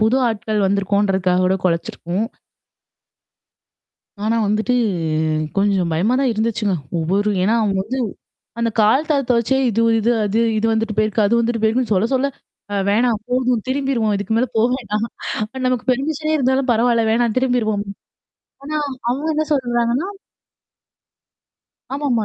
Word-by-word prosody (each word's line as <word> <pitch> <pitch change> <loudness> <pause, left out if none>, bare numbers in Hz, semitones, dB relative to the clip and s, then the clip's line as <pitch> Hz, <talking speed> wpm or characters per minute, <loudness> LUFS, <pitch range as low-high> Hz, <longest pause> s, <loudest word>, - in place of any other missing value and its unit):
புது 220 +4 +3
ஆட்கள் 215 -2 -1
வந்திருக்கோன்றதுக்காக 195 -2 +1
கூட 190 +1 +2
கொலச்சிருக்கும்! 175 +2 -1 2.0
ஆனா 225 +2 +1
வந்துட்டு 215 +4 +1 0.8
கொஞ்சம் 195 -3 +2
பயமா 190 +10 +1
தான் 265 - +2
இருந்துச்சுங்க. 220 -2 0 0.2
ஒவ்வொரு 195 +6 +1
ஏன்னா 215 +5 +2
அவுங்க 195 -3 0
வந்து, 255 +5 -4 0.6
அந்த 235 - +1
கால் 260 +9 +3
தடத்த 260 -4 +2
வச்சே 235 +3 +1
இது, 225 0 0 0.2
இது, 230 +2 +2
அது, 205 +3 0 0.2
இது 215 - 0
வந்துட்டு 220 -1 -1
போயிருக்கு. 215 0 +2
அது 235 +3 +2
வந்துட்டு 230 -1 -1
போயிருக்குன்னு, 225 0 +1
சொல்ல, 195 +4 +2
சொல்ல, 265 +2 +1 0.4
அ 205 - -2
வேணாம் 220 +1 +2
போதும் 250 -3 0
திரும்பிருவோம். 260 -5 0
இதுக்கு 200 +2 -2
மேல 250 +3 +1
போ 220 - +3
வேண்டாம். 215 -3 -2 0.6
நமக்கு 255 -3 -1
பெர்மிஷனே 310 +4 -1
இருந்தாலும் 265 -1 +1
பரவால்ல. 235 0 +2
வேணாம் 230 -1 +1
திரும்பிருவோம். 235 -5 0 0.8
ஆனா, 305 +2 -3 0.3
அவுங்க 275 +6 -1
என்ன 310 +1 +1
சொல்லறாங்கன்னா 240 +3 0 1.9
ஆமாமா. 270 -6 0
225 Hz, 130 wpm, -19 LUFS, 205-255 Hz, 2.0 s, புது